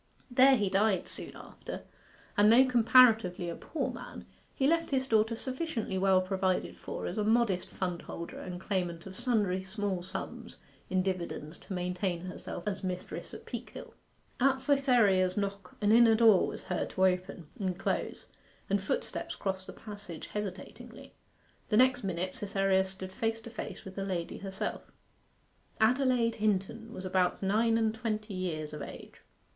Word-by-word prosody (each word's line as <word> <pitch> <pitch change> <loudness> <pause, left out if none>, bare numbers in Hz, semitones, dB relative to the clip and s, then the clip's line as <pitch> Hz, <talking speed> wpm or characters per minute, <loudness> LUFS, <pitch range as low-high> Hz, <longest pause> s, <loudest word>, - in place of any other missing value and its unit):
There 265 +2 +7
he 210 -5 +1
died 195 0 +2
soon - - -3
after, - - -8 0.5
and 205 +1 +6
though 255 +3 +7
comparatively 225 -7 +5
a 170 - -4
poor 325 - -3
man, - - -9 0.3
he 270 - +1
left 330 +3 +2
his 265 -2 +1
daughter 220 -1 +2
sufficiently 255 - -3
well 190 -1 +4
provided 185 0 -1
for - - -6
as 185 - -3
a - - +1
modest 215 -4 +2
fundholder 175 -2 -5
and 180 -1 -6
claimant 175 -4 -2
of 190 -1 -9
sundry 205 -6 +1
small 190 -1 -3
sums 185 +2 -7 0.3
in 185 0 +1
dividends 175 -4 -4
to - - -8
maintain 180 -1 -2
herself 180 -1 -6
as 205 -1 -2
mistress 180 -1 -4
at - - -11
Peakhill. - - -8 0.5
At 265 0 +3
Cytherea's 230 -10 +3
knock 200 -2 -3
an 205 0 +3
inner 230 0 +7
door 220 -4 +6
was - - -6
heard - - -2
to 190 - +2
open 180 -2 -1
and 185 -3 -1
close, - - -2 0.5
and 200 0 +2
footsteps 195 - -3
crossed 190 -1 -3
the - - -8
passage 205 -6 -9
hesitatingly. 225 +6 -7 0.5
The 210 - +2
next 255 0 +4
minute 185 -1 -2
Cytherea 195 -1 +1
stood 190 0 -3
face 225 +3 -1
to 230 - -10
face 225 - -7
with 190 - -8
the 195 - -4
lady 175 -3 -3
herself. 195 -1 -5 0.9
Adelaide 245 0 +3
Hinton 215 +2 -1
was 190 -5 -7
about 185 0 +1
nine 225 +4 +3
and 220 -1 +1
twenty 215 -2 -3
years 160 -5 -3
of 150 - -6
age. - - -10
200 Hz, 160 wpm, -31 LUFS, 185-230 Hz, 0.9 s, There